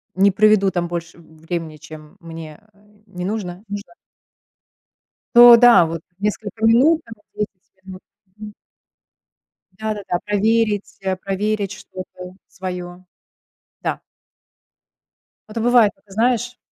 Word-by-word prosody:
Не 195 Hz, +1 st, +4 dB
проведу 210 Hz, -1 st, +4 dB
там 175 Hz, -2 st, -2 dB
больше 170 Hz, 0 st, -6 dB
времени, 160 Hz, -1 st, -7 dB
чем 155 Hz, 0 st, -13 dB
мне, 165 Hz, -2 st, -10 dB
э, 200 Hz, -, -28 dB, 0.3 s
не 180 Hz, -2 st, -6 dB
нужно 195 Hz, -2 st, -4 dB
нужно. 205 Hz, +10 st, -7 dB, 1.4 s
То 240 Hz, 0 st, +10 dB
да, 235 Hz, -8 st, +7 dB
вот 165 Hz, 0 st, -5 dB, 0.2 s
несколько 210 Hz, +1 st, -4 dB
минут, 275 Hz, +9 st, +4 dB
там 230 Hz, -, -10 dB
вот -, -, -31 dB
10 195 Hz, -2 st, -7 dB
минут. 185 Hz, -1 st, -10 dB, 0.4 s
Мгм. 210 Hz, -1 st, -9 dB, 1.3 s
Да-да-да, 210 Hz, -5 st, -3 dB
проверить, 210 Hz, 0 st, 0 dB
э, 190 Hz, -1 st, -1 dB
проверить 200 Hz, +1 st, -2 dB
что-то 185 Hz, -1 st, -10 dB
своё. 180 Hz, -1 st, -7 dB, 0.8 s
Да. -, -, -3 dB, 1.5 s
А -, -, -10 dB
то 230 Hz, -, -3 dB
бывает, 235 Hz, -3 st, +4 dB
это 200 Hz, -, -25 dB
знаешь, 245 Hz, +3 st, 0 dB
195 Hz, 120 wpm, -20 LUFS, 180-215 Hz, 1.5 s, То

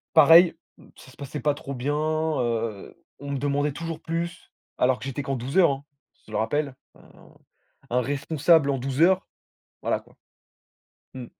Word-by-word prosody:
Pareil, 165 Hz, +3 st, +8 dB, 0.2 s
mmh, -, -, -18 dB
ça 130 Hz, -, -15 dB
se -, -, -19 dB
passait 140 Hz, 0 st, -6 dB
pas 145 Hz, +1 st, +1 dB
trop 140 Hz, -1 st, -7 dB
bien, 135 Hz, +4 st, -2 dB
heu, 140 Hz, -9 st, -2 dB, 0.2 s
on 140 Hz, 0 st, -8 dB
me 140 Hz, -, -1 dB
demandait 145 Hz, +1 st, 0 dB
toujours 165 Hz, +2 st, -6 dB
plus 170 Hz, +1 st, -5 dB, 0.3 s
alors 125 Hz, 0 st, +2 dB
que -, -, -9 dB
j'étais 135 Hz, +1 st, -4 dB
qu'en 135 Hz, 0 st, -2 dB
12 130 Hz, +8 st, -2 dB
heures, 175 Hz, -6 st, +6 dB
hein, 135 Hz, +1 st, -4 dB, 0.4 s
je 110 Hz, -, -14 dB
le -, -, -2 dB
rappelle. 140 Hz, +5 st, -1 dB, 0.2 s
Un -, -, -19 dB, 0.6 s
un 125 Hz, +1 st, +2 dB
responsable 145 Hz, +2 st, +2 dB
en 135 Hz, -, 0 dB
12 135 Hz, +2 st, -3 dB
heures, 190 Hz, +2 st, +4 dB, 0.6 s
voilà, -, -, 0 dB
quoi. -, -, -23 dB, 1.0 s
Mmh. 125 Hz, -2 st, -7 dB
140 Hz, 175 wpm, -25 LUFS, 130-155 Hz, 1.0 s, Pareil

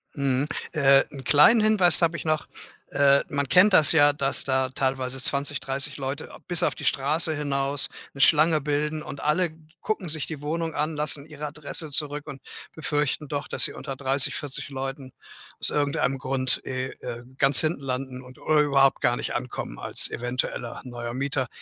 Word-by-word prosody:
Mhm. 140 Hz, 0 st, -1 dB, 0.3 s
Äh, 140 Hz, -2 st, +4 dB
'n 135 Hz, -2 st, -10 dB
kleinen 155 Hz, -, +5 dB
Hinweis 190 Hz, -7 st, +4 dB
habe 170 Hz, 0 st, +1 dB
ich -, -, -9 dB
noch. 155 Hz, -1 st, -2 dB, 0.4 s
Äh, 140 Hz, 0 st, +3 dB
man 140 Hz, -2 st, -3 dB
kennt 185 Hz, +7 st, +5 dB
das 155 Hz, -4 st, +7 dB
ja, 145 Hz, -2 st, +4 dB
dass 140 Hz, -1 st, +2 dB
da 130 Hz, -1 st, -1 dB
teilweise 130 Hz, 0 st, -3 dB
20, 140 Hz, +1 st, +1 dB
30 140 Hz, +2 st, -1 dB
Leute 140 Hz, +2 st, -6 dB
a -, -, -14 dB
bis 175 Hz, -1 st, +1 dB
auf -, -, +1 dB
die -, -, -9 dB
Straße 155 Hz, +4 st, +2 dB
hinaus 140 Hz, -1 st, 0 dB, 0.3 s
'ne 135 Hz, -, -5 dB
Schlange 155 Hz, +1 st, +3 dB
bilden 150 Hz, +1 st, -2 dB
und 140 Hz, -, -9 dB
alle 155 Hz, +3 st, 0 dB, 0.3 s
gucken 205 Hz, -5 st, -4 dB
sich 155 Hz, -2 st, +1 dB
die 155 Hz, -3 st, -8 dB
Wohnung 160 Hz, +2 st, -4 dB
an, 155 Hz, +1 st, -3 dB
lassen 150 Hz, -1 st, +1 dB
ihre 150 Hz, -1 st, -8 dB
Adresse 150 Hz, +1 st, -3 dB
zurück 145 Hz, 0 st, +1 dB
und 140 Hz, -3 st, -10 dB, 0.3 s
befürchten 150 Hz, -1 st, -3 dB
doch, 145 Hz, 0 st, -5 dB
dass -, -, +3 dB
sie -, -, -1 dB
unter 135 Hz, -1 st, -8 dB
30, 135 Hz, 0 st, +4 dB
40 145 Hz, -2 st, -4 dB
Leuten 135 Hz, -1 st, -7 dB, 0.5 s
aus -, -, +3 dB
irgendeinem 140 Hz, -2 st, -1 dB
Grund 130 Hz, 0 st, 0 dB
eh, 130 Hz, 0 st, -4 dB
äh, 120 Hz, -1 st, -7 dB
ganz 135 Hz, 0 st, +5 dB
hinten 155 Hz, -2 st, -1 dB
landen 130 Hz, -1 st, -6 dB
und 125 Hz, 0 st, -16 dB
überhaupt 145 Hz, -3 st, +2 dB
gar 120 Hz, 0 st, +1 dB
nicht -, -, -5 dB
ankommen 125 Hz, 0 st, -6 dB
als -, -, +4 dB
eventueller 120 Hz, -1 st, -5 dB
neuer 120 Hz, -2 st, -7 dB
Mieter. 135 Hz, 0 st, -2 dB
140 Hz, 180 wpm, -24 LUFS, 135-150 Hz, 0.5 s, das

